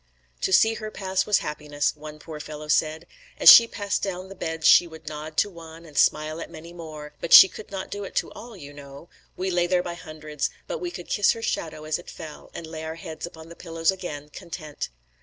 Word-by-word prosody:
"To - - 0
see 220 +4 +5
her 215 -1 -6
pass 190 -2 -2
was 210 - +4
happiness," 150 -1 -2
one 150 0 -10
poor 155 0 -9
fellow 150 0 -8
said. 155 +2 +1 0.3
"As - - +11
she 230 - +10
passed 205 -3 -2
down 185 -1 -4
the 195 - -10
beds 160 -3 -4
she 175 - +7
would 160 -1 -13
nod 155 +1 -7
to - - +4
one 165 -3 -12
and 150 -3 -15
smile 155 +3 +2
at - - -7
many 165 +2 -11
more; 155 -3 -9
but 170 - -4
she - - +12
could 210 - -11
not 195 -1 -6
do 205 0 -4
it 195 - -9
to - - -1
all, 230 -2 -11
you 145 -4 -11
know. 140 +3 -12 0.3
We 190 +1 -2
lay 175 -1 +2
there 180 0 +2
by 175 - -4
hundreds; 155 -3 -5 0.2
but - - -4
we 355 - -3
could 175 - -9
kiss 205 - +3
her 225 - -8
shadow 155 -6 -3
as 155 +1 -2
it 175 - -12
fell, 155 -3 -10
and 170 - -6
lay 160 0 -7
our 160 0 -5
heads 165 0 -7
upon 160 -1 -13
the 170 - -11
pillows 165 0 0
again, 150 -6 -7
content." 160 -3 -7
165 Hz, 235 wpm, -25 LUFS, 155-185 Hz, 0.3 s, she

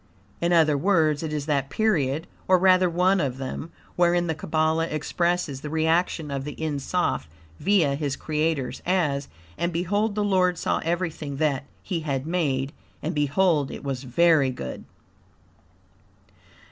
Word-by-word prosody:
In 170 +1 +1
other 155 -4 +4
words, 160 -5 +2
it 160 -2 -4
is 150 -2 -2
that 140 -3 0
period 160 -7 +1 0.2
(or 185 - +6
rather 185 0 +4
one 180 +2 +2
of 130 -3 -2
them) 135 +4 -5 0.2
wherein 175 0 +3
the 165 - 0
Kabbalah 160 +1 0
expresses 155 -2 -1
the 150 - -5
reaction 160 0 +1
of 135 -1 -3
the 145 0 -7
En 155 -3 -2
Soph, 80 - -1 0.3
via 185 -8 +3
his 140 -1 -2
Creators, 150 -5 -2
as 150 -7 0 0.3
"And 170 - 0
behold 200 +5 0
the 210 - 0
Lord 185 -3 +2
saw - - 0
everything 165 -4 -2
that 140 -3 0 0.2
He 175 - -2
had 140 -4 -2
made, 145 -5 -1 0.3
and 160 +4 -2
behold 150 0 +2
it - - -8
was 135 -3 -3
very 145 +2 +3
good." 65 - -6
160 Hz, 150 wpm, -25 LUFS, 140-175 Hz, 0.3 s, or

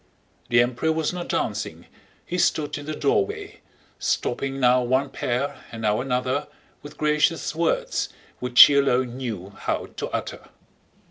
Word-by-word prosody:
The 120 0 +5
Emperor 125 +6 -1
was 160 +1 -1
not 175 -1 -5
dancing, - - -2 0.4
he 180 - -3
stood 150 -4 +1
in 145 - -10
the 155 - -3
doorway, 415 0 -1 0.4
stopping 135 0 -1
now 125 0 +4
one 130 +3 0
pair 125 +4 -2
and 115 -1 -7
now 105 +1 +2
another 130 +2 -1 0.3
with 145 - -11
gracious 150 +2 +1
words 165 +1 0 0.3
which 125 -1 0
he 145 - +5
alone 130 -3 +2
knew 105 -7 -5
how - - -3
to - - -3
utter. - - -5
135 Hz, 145 wpm, -24 LUFS, 125-160 Hz, 0.4 s, The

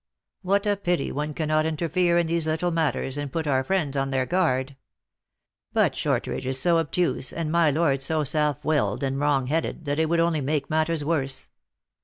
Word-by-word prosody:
What 200 +3 +1
a 205 -1 +1
pity 175 -6 -1
one 150 +1 -3
cannot 155 0 +1
in 160 -1 -2
terfere 175 +2 +2
in 170 - +1
these 165 -1 -1
little 160 +3 0
matters, 150 -4 -1
and 145 -2 -4
put 160 +2 -2
our 135 -3 +1
friends 155 -4 -1
on 135 0 0
their 130 -1 0
guard! 140 -6 0 1.0
But - - +2
Shortridge 130 - -2
is 130 0 +1
so 170 +2 +3
obtuse, 165 -3 0
and 165 -2 -3
my 170 -2 +4
Lord 145 -2 +1
so 155 +3 0
self 150 0 0
willed 150 -2 0
and 135 0 -1
wrong 145 -2 +1
headed, 160 +3 -2
that 145 +1 -1
it 160 -1 +1
would 170 0 +2
only 165 -2 +2
make 140 +1 -2
matters 155 -1 0
worse. 135 -4 -2
155 Hz, 195 wpm, -25 LUFS, 140-170 Hz, 1.0 s, my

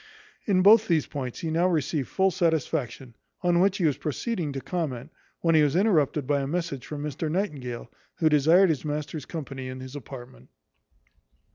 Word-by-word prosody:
In 185 -3 +3
both 220 +2 +7
these 160 -4 +2
points 130 -4 -6
he 160 - -2
now 170 +3 +2
received 150 -5 -1
full 190 0 +1
satisfaction; 155 - -1 0.3
on 175 -1 +3
which 195 +2 +3
he 180 - 0
was 145 -4 +1
proceeding 165 - -3
to 135 - -3
comment, 150 -4 -4 0.3
when 165 -1 +2
he 155 - +6
was 150 0 +2
interrupted 160 -8 +2
by 140 +1 +1
a 135 - -3
message 165 -4 -3
from 145 -1 -5
Mr 150 +1 -3
Nightingale, 150 - -3 0.3
who 165 - +2
desired 160 +5 +5
his 155 -4 -1
master's 150 -1 -4
company 135 -5 -6
in 130 0 -7
his 130 +2 -9
apartment. 120 - -10
155 Hz, 175 wpm, -26 LUFS, 135-175 Hz, 0.3 s, both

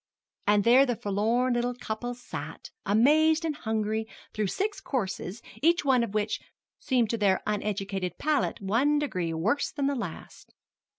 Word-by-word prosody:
And 205 0 +4
there 245 +5 +7
the 245 - 0
forlorn 225 +5 +1
little 240 +1 0
couple 245 +1 -4
sat, 245 - -8 0.2
amazed 310 - +4
and 310 -2 -1
hungry, 220 -2 -2 0.3
through 215 -1 0
six 410 - -2
courses, 210 -4 -3 0.2
each 335 +1 +3
one 260 -3 +4
of 215 -2 -5
which 215 0 0 0.4
seemed 245 -5 +1
to 230 - -2
their 195 -2 +3
uneducated 200 -3 -2
palate 305 -5 0
one 235 +9 +2
degree 185 - -1
worse 205 - 0
than 285 -2 -2
the 280 - +2
last. 205 -11 -7
230 Hz, 155 wpm, -28 LUFS, 205-275 Hz, 0.4 s, there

